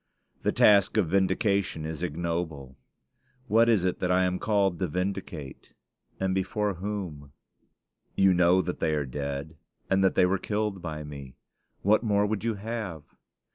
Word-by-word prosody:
The - - +1
task 100 0 +4
of 95 -7 +2
vindication 100 -3 +1
is 80 0 -5
ignoble. 85 -5 -3 0.7
What 115 +1 +4
is 105 -6 +3
it 90 - -1
that 90 - -1
I 90 0 +3
am 90 0 0
called 100 -5 +1
to 95 - 0
vindicate? 90 -4 -5 0.5
and 95 -1 0
before 100 +2 -1
whom? 90 -7 -6 0.8
You 95 -1 +5
know 90 +1 +4
that 90 +1 -4
they 80 - +1
are 75 -2 -1
dead, 70 +4 -5 0.3
and 95 0 +3
that 95 - +3
they - - +5
were 95 +1 +1
killed 105 -2 -2
by 75 -3 -5
me. 70 -3 -9 0.5
What 105 +2 +4
more 105 -3 +2
would 105 0 -2
you 115 -1 0
have? 105 -7 -5
90 Hz, 160 wpm, -27 LUFS, 80-100 Hz, 0.8 s, You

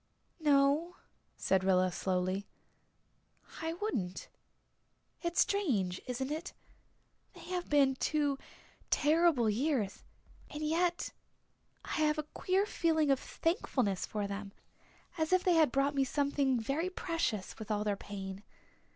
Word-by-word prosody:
"No," 295 +3 +3 0.4
said 190 -1 +2
Rilla 185 -1 +3
slowly. 185 +2 -1 1.1
"I 325 0 -2
wouldn't. 230 - -3 0.9
It's 340 0 +2
strange 220 - +1
isn't 260 +2 -3
it? 320 +5 -4 0.8
They - - -13
have 360 -1 -2
been 280 -2 +4
two 290 -2 0 0.5
terrible 305 -5 +3
years 230 -2 0 0.5
and 300 +1 -5
yet 340 +3 +1 0.7
I - - -10
have 305 -1 +2
a 305 - -1
queer 380 +2 +1
feeling 320 -7 +2
of 270 - +3
thankfulness 255 - -1
for 210 -1 -2
them 200 0 -5 0.7
as 315 +1 0
if 370 0 +4
they 360 - +4
had 315 -5 +5
brought 275 +2 +2
me 275 -1 +2
something 280 -1 +1
very 280 +10 -1
precious, 330 - -2
with 220 0 -7
all 210 -1 0
their 205 -1 0
pain. 195 -1 -7
280 Hz, 125 wpm, -33 LUFS, 205-325 Hz, 1.1 s, had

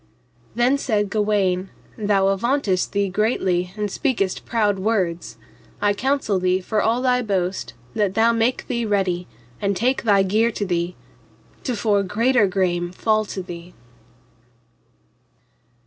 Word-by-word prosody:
Then 250 +4 +3
said 210 -7 0
Gawaine, 200 -3 +1 0.3
thou 200 -2 +2
avauntest 200 -2 0
thee 200 0 +1
greatly 185 -3 0
and 210 -1 -2
speakest 210 -9 -1
proud 210 -4 +1
words, 180 - -1 0.4
I 205 0 +2
counsel 260 -4 0
thee 185 0 +2
for 210 +3 -1
all 235 +3 +1
thy 250 -1 +3
boast 190 - -2 0.2
that 200 -2 0
thou 225 +1 +4
make 230 +2 0
thee 235 -2 -1
ready, 190 -4 0 0.3
and 200 -1 0
take 255 +5 +1
thy 200 -4 +4
gear 215 +5 +2
to 205 - -2
thee, 175 -1 -1 0.7
to 250 - -1
fore 205 -1 +2
greater 225 +3 +2
grame 175 -2 0
fall 215 +3 +1
to 190 -2 -5
thee. 175 0 -10
205 Hz, 135 wpm, -22 LUFS, 185-225 Hz, 0.7 s, thou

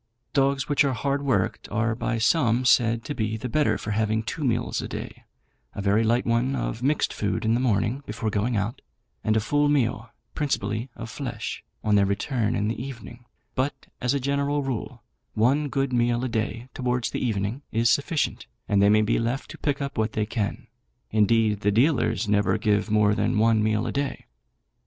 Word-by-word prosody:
Dogs 135 -1 +2
which 145 0 +3
are 140 -2 +1
hard 140 +4 -1
worked 130 -10 0
are 110 +2 0
by 115 +1 -2
some 120 0 +2
said 115 -1 +3
to 145 - -3
be 110 -3 -2
the 120 - -5
better 150 +5 +2
for 105 - -5
having 110 +1 0
two 150 +7 -4
meals 120 -4 0
a - - -5
day - - -7 0.5
a - - -3
very 105 +3 +3
light 120 +2 +2
one 120 +4 +1
of 115 -3 -3
mixed 145 +4 +1
food 100 -1 -2
in 110 - +3
the 120 - +2
morning 120 +2 +1
before 110 +1 -3
going 110 +3 0
out, 100 +4 -2 0.4
and 110 0 +2
a - - +4
full 145 +7 +1
meal, 120 -5 +1 0.2
principally 115 -5 -2
of 115 -1 -7
flesh, 120 -5 -5 0.2
on 105 - +1
their 100 -1 +4
return 110 +3 0
in 105 - 0
the 115 +2 -3
evening; 120 -2 -9 0.3
but, 135 +1 -2 0.2
as 125 +3 +1
a - - +1
general 140 +2 0
rule, 120 -3 -4 0.3
one 135 +7 +2
good 135 0 -1
meal 120 0 +2
a - - 0
day, 115 +1 -3
towards 125 -2 -1
the - - -3
evening, 110 +2 -1
is 115 +1 +2
sufficient, 145 +4 0 0.2
and 100 -1 +3
they 100 - +5
may 110 +1 +5
be 105 - +1
left 120 +4 -2
to - - -9
pick 145 -1 -1
up 140 -4 -4
what 110 0 0
they 110 - 0
can: 105 -2 -3 0.5
indeed 110 0 +3
the 105 - +1
dealers 120 0 +2
never 105 0 +2
give 105 0 +1
more 105 -1 +4
than 105 - 0
one 110 0 +4
meal 110 +1 +1
a - - -2
day. 140 -1 -3
115 Hz, 200 wpm, -25 LUFS, 110-135 Hz, 0.5 s, they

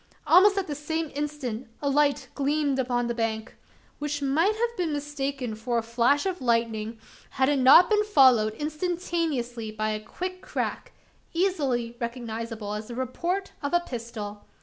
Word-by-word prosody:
Almost 375 +6 +6
at 390 - +1
the 300 - -4
same 315 +2 -3
instant 280 -5 -4
a 285 - -2
light 285 0 +2
gleamed 285 -1 0
along 245 -1 0
the 235 - -1
bank 225 -1 -3 0.4
which 295 0 -2
might 315 +9 +2
have 470 +1 -1
been 350 -6 -1
mistaken 280 -4 -3
for 235 +2 -2
a 230 - 0
flash 240 +6 +2
of 370 -4 -2
lightning, 230 -2 0 0.3
had 265 0 +1
it 290 -2 +2
not 275 +7 +8
been 420 -1 +3
followed 255 - +5
instantaneously 305 -6 -2
by 215 0 -2
a 215 - -2
quick 365 +9 -5
crack - - -3 0.4
easily 275 -10 0
recognisable 230 -3 -4
as 210 +1 -5
the 240 - -7
report 340 +10 -2
of 285 +4 0
a - - +5
pistol! 230 -8 -7
270 Hz, 160 wpm, -26 LUFS, 235-320 Hz, 0.4 s, not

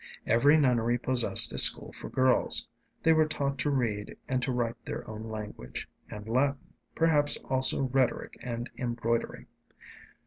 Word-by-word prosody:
Every 140 +7 +3
nunnery 120 -4 +1
possessed 125 -1 +3
a - - +2
school - - +6
for - - -9
girls. 130 0 +3 0.4
They 160 - +4
were 155 -1 +2
taught 140 -2 -3
to 145 - -1
read 115 -7 -3
and 130 -1 -2
to 125 - -2
write 120 -1 -4
their - - -7
own 110 0 -8
language 105 - -8 0.2
and 105 0 -10
Latin, 135 +4 -2 0.2
perhaps 150 -3 +3
also 130 +1 +2
rhetoric 130 -1 -2
and 120 0 -6
embroidery. 115 -1 -3
125 Hz, 145 wpm, -27 LUFS, 115-140 Hz, 0.4 s, school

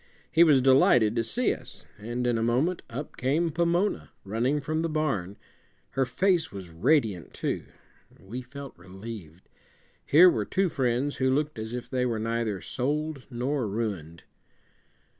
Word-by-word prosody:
He 165 +1 +6
was 145 -6 +5
delighted 125 -4 +5
to 115 - +1
see 240 - +2
us, 125 - -8
and 120 +4 -3
in 120 -1 +2
a 115 - 0
moment 130 +10 +1
up 135 +6 -7
came 155 +6 +1
Pomona, 170 +5 0 0.2
running 120 +8 0
from 155 +2 -2
the 165 - -1
barn. 135 - -1 0.5
Her 135 -1 +1
face 180 +4 +1
was 95 -4 -8
radiant, 110 - +1
too. - - -2 0.5
We 115 +7 -7
felt 140 +2 -10
relieved. 95 -2 -10 0.6
Here 170 +6 +7
were 180 - +3
two 190 -1 0
friends 135 -1 0
who 130 0 +2
looked 145 -1 0
as 110 +1 -5
if 125 0 -5
they 125 -1 0
were 115 -2 -1
neither 110 -3 -2
sold 145 +2 -3
nor 125 0 -1
ruined. 100 -7 -4
125 Hz, 155 wpm, -27 LUFS, 110-150 Hz, 0.6 s, Here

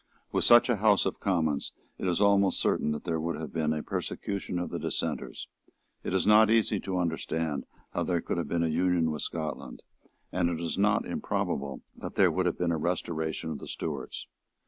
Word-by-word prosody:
With - - +2
such 120 0 +8
a 120 -3 +2
House 105 -1 +4
of - - -2
Commons 80 -7 0 0.3
it - - -2
is 90 0 +1
almost 100 -1 +4
certain 75 - +1
that 75 - -3
there 85 -2 -1
would 85 +1 -2
have 80 -4 -6
been 80 -1 +1
a 75 -1 -2
persecution 100 -2 -3
of 90 - -3
the - - -3
Dissenters; - - -3 0.6
it - - -3
is 95 0 +2
not 105 +1 +7
easy 110 -2 +3
to 95 -1 -3
understand 80 -4 -2 0.3
how - - -1
there 90 -2 +1
could - - -3
have 85 - -2
been 85 +2 0
an 80 - +1
union 90 -1 +2
with 75 - -4
Scotland; 80 -2 -5 0.5
and 85 - +1
it 85 -2 -2
is 85 -1 -2
not 100 +1 +2
improbable 70 -1 -2
that - - -7
there - - +5
would 90 -1 +1
have 85 - -1
been 90 -1 0
a 80 - +1
restoration 80 -1 -2
of 75 - -5
the - - -9
Stuarts. - - -5
85 Hz, 205 wpm, -29 LUFS, 80-95 Hz, 0.6 s, such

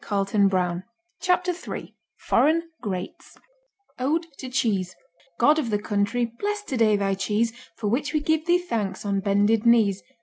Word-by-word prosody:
Chapter 360 0 +2
Three 355 - -7 0.2
Foreign 320 +3 +2 0.2
Greats 185 -3 -6 0.6
Ode 310 +6 0
to 260 - -6
Cheese 200 -7 0 0.4
God 305 +1 +5
of 255 -7 -2
the 210 - +1
country, 205 +3 0
bless 415 0 -2
today 230 - +2
Thy 200 -1 0
cheese, 210 +4 0 0.2
For 215 - -3
which 255 +7 0
we 305 - +1
give 315 +2 0
Thee 350 +1 +5
thanks 215 - -3
on 200 -1 0
bended 205 +2 +2
knees. 220 -5 +4
230 Hz, 140 wpm, -25 LUFS, 205-310 Hz, 0.6 s, God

